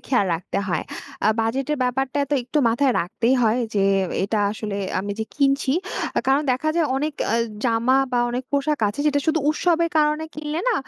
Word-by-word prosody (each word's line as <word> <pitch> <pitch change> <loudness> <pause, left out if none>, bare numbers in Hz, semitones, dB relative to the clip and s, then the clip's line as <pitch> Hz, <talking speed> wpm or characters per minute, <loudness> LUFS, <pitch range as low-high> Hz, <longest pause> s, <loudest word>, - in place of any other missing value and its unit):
খেয়াল 245 -7 +2
রাখতে 170 +3 -4
হয়। 175 -3 0 0.4
আ - - +5
বাজেটের 270 +6 -1
ব্যাপারটা 265 +2 -1
তো 290 - +3
একটু 255 +5 -2
মাথায় 250 +3 +2
রাখতেই 230 +9 0
হয় 225 +2 +3 0.2
যে, 200 - +2 0.4
"এটা 210 +2 -1
আসলে 210 -2 -5 0.2
আমি 200 +2 -3
যে, 220 - -1
কিনছি।" 275 -1 +2 0.5
কারণ 270 +2 +3
দেখা 260 +5 -1
যায় 335 -2 +3
অনেক 300 +2 -2
অ্যা 230 - +2 0.3
জামা 235 +2 +3 0.2
বা 245 - +2
অনেক 250 +2 -3
পোশাক 285 +1 +1
আছে 205 +7 -5
যেটা 285 -1 +2
শুধু 320 0 +2
উৎসবের 335 +1 +1
কারণে 300 +1 +2
কিনলে 305 +1 -3
না? 485 - +2
265 Hz, 180 wpm, -22 LUFS, 230-300 Hz, 0.5 s, আ